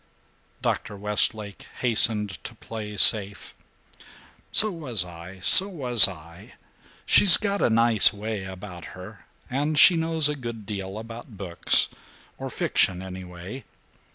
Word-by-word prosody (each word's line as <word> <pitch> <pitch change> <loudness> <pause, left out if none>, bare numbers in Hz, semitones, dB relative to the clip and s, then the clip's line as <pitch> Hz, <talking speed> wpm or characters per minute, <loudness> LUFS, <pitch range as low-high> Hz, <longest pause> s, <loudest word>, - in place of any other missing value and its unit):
Dr. 105 -3 -4
Westlake 105 0 -2
hastened 110 -4 -2
to 120 - -10
play 105 -2 -10
safe. 100 -2 +3 1.0
"So 215 0 +4
was 130 - -3
I! 90 +2 -13
So 190 - +6
was 125 - +3
I! 85 0 -14 0.5
She's 195 -4 +6
got 200 -1 -4
a - - +1
nice 115 -1 +3
way 105 -1 -7
about 95 -2 -11
her, - - -14 0.2
and 145 +4 -4
she 175 +4 +6
knows 160 -2 +2
a 150 - -4
good 115 -5 -9
deal 100 -1 -8
about 115 0 -12
books, 90 -3 +3 0.5
or - - -7
fiction 95 0 -2
anyway. 95 +5 -11
105 Hz, 125 wpm, -23 LUFS, 95-125 Hz, 1.0 s, So